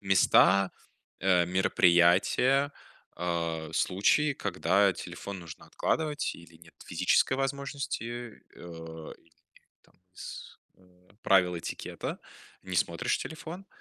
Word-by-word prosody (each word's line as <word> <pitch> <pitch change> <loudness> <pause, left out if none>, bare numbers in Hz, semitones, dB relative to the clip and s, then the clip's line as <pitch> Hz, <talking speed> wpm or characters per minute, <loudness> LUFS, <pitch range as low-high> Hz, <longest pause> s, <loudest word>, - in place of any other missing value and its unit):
места, 95 0 +4 0.5
э, 90 -1 +3
мероприятия, 95 - +3 0.5
э, 85 -2 -2
случаи, 105 +11 +2
когда 100 -3 +1
телефон 90 +3 -7
нужно 85 -2 -11
откладывать, 155 -2 -1
или 85 -1 -15
нет 80 0 -19
физической 130 - +2
возможности, 140 -1 -3 0.5
э, 80 -2 -9
или 85 0 -29 0.3
нет - - -42
там - - -28 0.2
с - - -9 0.7
правила 90 -3 +3
этикета, 80 - -6 0.4
не 95 -1 -5
смотришь - - 0
телефон. 165 +4 -8
95 Hz, 100 wpm, -29 LUFS, 85-135 Hz, 0.7 s, места